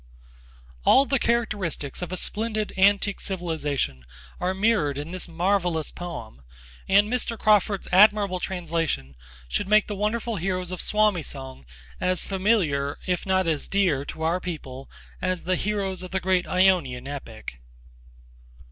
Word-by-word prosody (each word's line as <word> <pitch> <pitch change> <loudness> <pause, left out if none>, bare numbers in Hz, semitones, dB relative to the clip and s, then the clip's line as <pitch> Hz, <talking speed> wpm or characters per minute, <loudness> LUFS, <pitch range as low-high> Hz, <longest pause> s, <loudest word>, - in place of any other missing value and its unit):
All 275 - +6
the 270 -2 +1
characteristics 210 - -1
of 180 -1 -4
a 185 - -2
splendid 215 +1 -2
antique 200 +1 +3
civilisation 150 - -2 0.4
are 185 +1 -1
mirrored 190 -9 +2
in 145 +3 -5
this 185 0 -4
marvellous 175 -2 0
poem, 170 - -8 0.5
and 200 +2 +5
Mr. 235 0 -1
Crawford's 210 -2 +2
admirable 200 -1 +5
translation 165 - -2 0.3
should - - -2
make 215 +1 +5
the 210 - -5
wonderful 215 +2 -1
heroes 185 0 -2
of 185 - -3
Suomi 210 -4 +2
song 130 - -7 0.3
as 185 0 +1
familiar 185 -9 +1
if 180 +1 -1
not 190 0 +2
as 160 -3 -1
dear 185 -9 +1
to 160 - -6
our 165 +3 +1
people 135 -7 -7 0.3
as 185 -1 -1
the 185 +1 +1
heroes 195 -2 -2
of 185 - -7
the 190 - -1
great 185 -1 +1
Ionian 170 -9 +2
epic. 115 - -8
185 Hz, 140 wpm, -25 LUFS, 160-200 Hz, 0.5 s, All